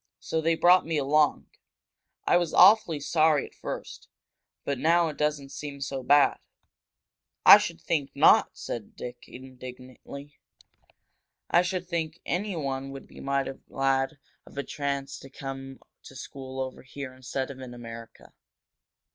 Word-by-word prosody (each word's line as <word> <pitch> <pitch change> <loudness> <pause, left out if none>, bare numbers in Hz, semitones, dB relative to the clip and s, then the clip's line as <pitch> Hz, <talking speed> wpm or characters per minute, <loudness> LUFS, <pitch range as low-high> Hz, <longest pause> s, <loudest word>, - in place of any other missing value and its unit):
So 160 - -2
they 165 +1 +2
brought 180 +2 +5
me 160 -1 -2
along. 145 +1 +2 0.8
I - - +4
was 175 -2 +1
awfully 185 -5 +6
sorry 155 0 +2
at - - -15
first, - - -7 0.6
but 140 -2 -2
now 170 +2 +3
it 150 - -8
doesn't 150 -2 -1
seem 140 0 -7
so 135 -1 -4
bad." 145 +3 +4 1.1
"I - - +11
should 80 - -4
think 145 -4 -1
not!" - - +6
said 115 -3 -6
Dick, 120 0 -8
indignantly. 130 +2 -11 1.1
"I 175 - +6
should 180 0 -3
think 170 -1 -3
anyone 150 -9 -2
would 135 0 -9
be - - -15
mighty 140 0 -1 0.2
glad 135 +1 0 0.3
of - - -15
a 140 - -1
chance 140 0 -4
to 135 - -12
come 135 -1 -7 0.3
to 135 - -12
school 130 0 -8
over 130 -1 -4
here 130 0 -8
instead 130 +1 -4
of 135 - -11
in 125 -2 -9
America! 115 -1 -11
140 Hz, 145 wpm, -27 LUFS, 130-155 Hz, 1.1 s, I